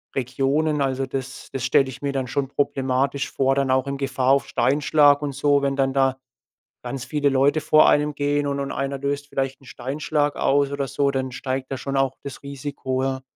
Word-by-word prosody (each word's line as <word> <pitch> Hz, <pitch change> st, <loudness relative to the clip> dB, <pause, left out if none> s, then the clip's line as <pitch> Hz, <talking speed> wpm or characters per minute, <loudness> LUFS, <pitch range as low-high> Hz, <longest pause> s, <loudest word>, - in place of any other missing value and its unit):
Regionen. 140 Hz, +4 st, 0 dB
Also 135 Hz, 0 st, -1 dB
das 135 Hz, 0 st, -6 dB
das 135 Hz, -, -3 dB
stelle 130 Hz, +1 st, +3 dB
ich 130 Hz, -, -10 dB
mir 140 Hz, -, 0 dB
dann 135 Hz, -2 st, -2 dB
schon 135 Hz, +2 st, -2 dB
problematisch 135 Hz, 0 st, -1 dB
vor, 135 Hz, 0 st, +1 dB
dann 135 Hz, -1 st, +1 dB
auch 130 Hz, +1 st, +2 dB
in 140 Hz, -, -3 dB
Gefahr 135 Hz, -2 st, -1 dB
auf 140 Hz, -, +1 dB
Steinschlag 145 Hz, +1 st, +3 dB
und 145 Hz, -, -2 dB
so. 145 Hz, 0 st, +2 dB
Wenn 140 Hz, 0 st, +1 dB
dann 135 Hz, -1 st, +1 dB
da 135 Hz, -1 st, +2 dB, 0.7 s
ganz 125 Hz, +1 st, -5 dB
viele 145 Hz, +2 st, 0 dB
Leute 140 Hz, +3 st, +3 dB
vor 155 Hz, 0 st, +5 dB
einem 150 Hz, 0 st, +2 dB
gehen 145 Hz, 0 st, 0 dB
und 140 Hz, 0 st, -2 dB
und 140 Hz, 0 st, -3 dB
einer 135 Hz, 0 st, -3 dB
löst 140 Hz, +1 st, -2 dB
vielleicht 135 Hz, -1 st, -2 dB
'n -, -, -18 dB
Steinschlag 145 Hz, +4 st, -2 dB
aus 140 Hz, 0 st, +2 dB
oder 140 Hz, -1 st, -2 dB
so, 140 Hz, +1 st, +1 dB
dann 130 Hz, -1 st, -2 dB
steigt 130 Hz, +1 st, -4 dB
da -, -, -1 dB
schon 135 Hz, +1 st, -3 dB
auch 135 Hz, -1 st, +1 dB
das 140 Hz, 0 st, -8 dB
Risiko, 140 Hz, -2 st, -4 dB
ja. 135 Hz, 0 st, -2 dB
135 Hz, 205 wpm, -23 LUFS, 130-145 Hz, 0.7 s, vor